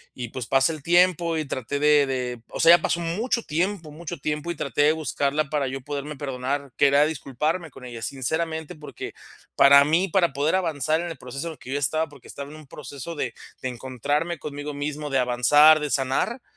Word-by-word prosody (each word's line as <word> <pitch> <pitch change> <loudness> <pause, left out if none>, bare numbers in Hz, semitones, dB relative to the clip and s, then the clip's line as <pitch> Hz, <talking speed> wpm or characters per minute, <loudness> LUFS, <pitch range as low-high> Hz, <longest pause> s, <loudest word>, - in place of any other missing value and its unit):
y 120 -3 -5
pues, 125 -2 -6
pasa 135 +4 +3
el 155 - -8
tiempo, 175 -1 +3
y 155 - -2
traté 130 +3 -3
de 150 -1 +5
de, 125 -3 -3
o - - -7
sea, 170 +1 +8
ya - - -13
pasó 175 - 0
mucho 220 +8 -1
tiempo 170 0 -2
mucho 170 +1 -7
tiempo 150 +3 -3
y - - -5
traté 140 -1 -1
de 155 +1 +5
buscarla 145 0 -1
para 145 -3 0
yo 135 +1 -4
poderme 145 +1 -5
perdonar, 135 0 -3
que 140 - +5
era 140 +2 +5
disculparme 155 +3 -2
con 125 - -12
ella, 120 -2 -8
sinceramente, 160 +6 -3
porque 150 -1 -8 0.4
para 140 0 +8
mí, 170 +6 +2
para 170 -5 +2
poder 150 +5 +1
avanzar 160 -3 0
en 175 - -4
el 160 - -8
proceso 135 +6 -6
que 130 - -9
yo 145 - 0
estaba, 155 +3 0
porque 140 -4 -16
estaba 140 0 -7
en 155 - -10
un 155 -3 -14
proceso 145 +3 -8
de 125 -5 -3 0.3
de 130 - -2
encontrarme 140 +7 -2
conmigo 145 0 -6
mismo, 145 +1 -4
de 135 - +2
avanzar, 145 +6 +6
de 150 -1 -3
sanar, 135 - 0
145 Hz, 205 wpm, -24 LUFS, 135-160 Hz, 0.4 s, sea